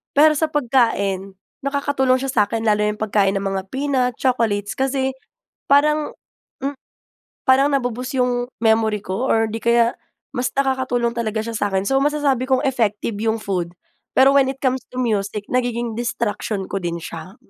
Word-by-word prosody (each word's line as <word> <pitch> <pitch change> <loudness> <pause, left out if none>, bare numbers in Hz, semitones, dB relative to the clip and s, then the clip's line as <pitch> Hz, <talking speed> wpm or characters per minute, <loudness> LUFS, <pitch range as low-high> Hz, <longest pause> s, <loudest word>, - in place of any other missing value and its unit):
Pero 305 +2 +7
sa 315 +1 +1
pagkain, 225 -9 +1 0.3
nakakatulong 275 -2 +1
siya 270 - -1
sa'kin 220 -1 +1
lalo 210 -2 +2
na 210 - +2
yong 215 - -18
pagkain 200 -2 +2
ng 195 - -1
mga 195 -1 -1
peanut, 265 -1 0
chocolates. 220 -5 0
Kasi 265 0 0 0.6
parang, 300 +2 +3 0.5
mm, 275 +2 -2 0.7
parang 270 +1 +5
na-bo-boost 250 -1 -2
yung 245 0 0
memory 220 -1 +2
ko, 210 +8 -2
or 225 0 +3
'di 220 +1 -5
kaya 235 0 +3 0.4
mas 250 -1 -1
nakakatulong 260 -3 +1
talaga 225 -2 -2
siya 230 - -4
sa 205 -1 0
'kin. 190 0 0
So, 270 0 +3
masasabi 280 -3 +1
kong 260 - +2
effective 225 -4 0
yung 225 0 +1
food. 180 -5 -2 0.5
Pero, 270 +1 +6
when 275 -1 +5
it 270 - -12
comes 260 -1 +1
to 255 - -5
music, 210 -3 -1
nagiging 240 -2 -1
distraction 215 -4 -2
ko 195 - -3
din 170 -1 -3
siya. 165 +3 -8
240 Hz, 165 wpm, -21 LUFS, 210-265 Hz, 0.7 s, Pero